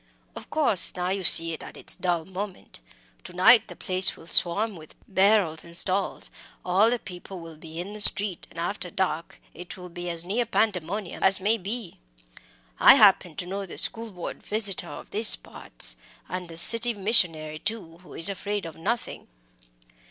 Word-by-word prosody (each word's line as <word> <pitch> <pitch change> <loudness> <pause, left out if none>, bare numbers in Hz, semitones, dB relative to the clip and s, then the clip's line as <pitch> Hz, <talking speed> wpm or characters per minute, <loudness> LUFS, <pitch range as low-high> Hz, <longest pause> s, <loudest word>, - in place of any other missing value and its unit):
Of - - -11
course, 250 - +2
now 180 0 -3
you 195 0 -3
see 165 -1 +7
it 160 - -8
at - - -11
its - - -1
dull 175 -3 -3
moment. 190 - -9 0.5
To - - -10
night 220 +7 +4
the - - -11
place 185 0 +1
will - - -15
swarm 195 +5 0
with 155 -2 -15
barrows 190 -5 +1
and 170 0 -3
stalls, 190 +2 -2 0.3
all 190 +5 +2
the 245 - -1
people 185 -2 -11
will 165 -1 -12
be 160 +1 -11
in 190 +4 -7
the 210 - -6
street, 200 -3 +5
and - - -19
after 180 +2 -4
dark 170 -3 -4
it 175 +3 -11
will 180 -1 -11
be 175 +1 -8
as 170 0 -3
near 225 +6 -2
pandemonium 200 -3 -3
as 190 0 +3
may 210 +4 +1
be. 205 0 -7 0.8
I - - +8
happen 190 -5 +4
to 175 - -6
know 195 +2 -6
the - - -11
School 230 0 +2
Board 180 -3 -8
visitor 200 -5 -2
of - - -11
these 215 +1 +3
parts; - - -2 0.3
and 180 -2 -7
a 165 - -7
City 230 +6 +6
Missionary, 165 -7 +1
too, 170 -6 -6
who 180 - -15
is 165 - +1
afraid 200 0 -3
of 165 - -9
nothing." 225 +9 -5
185 Hz, 180 wpm, -24 LUFS, 170-210 Hz, 0.8 s, I